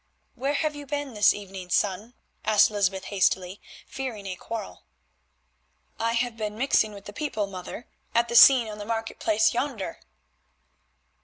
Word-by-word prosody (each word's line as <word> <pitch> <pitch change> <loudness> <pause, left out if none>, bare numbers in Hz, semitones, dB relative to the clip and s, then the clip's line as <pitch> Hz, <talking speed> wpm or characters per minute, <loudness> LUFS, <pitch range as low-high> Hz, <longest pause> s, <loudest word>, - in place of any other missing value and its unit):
"Where 275 +3 -2
have 305 0 -1
you 290 -1 -9
been 285 -2 -3
this 210 -2 +5
evening, 195 -3 -7
son?" 205 +6 0 0.3
asked 215 0 +4
Lysbeth 195 -2 0
hastily, 190 0 +1 0.2
fearing 255 -7 -6
a 190 -1 -4
quarrel. 225 +4 -7 1.2
"I 230 +1 0
have 240 0 -1
been 215 -1 -4
mixing 230 -4 +2
with 200 - -12
the 205 - -9
people, 275 -8 -2
mother, 195 +4 -8 0.3
at 235 0 +3
the 235 - -4
scene 250 -1 +8
on 210 -1 -7
the - - -5
market 225 0 -4
place 220 0 +2
yonder." 240 -9 -3
220 Hz, 155 wpm, -26 LUFS, 200-245 Hz, 1.2 s, scene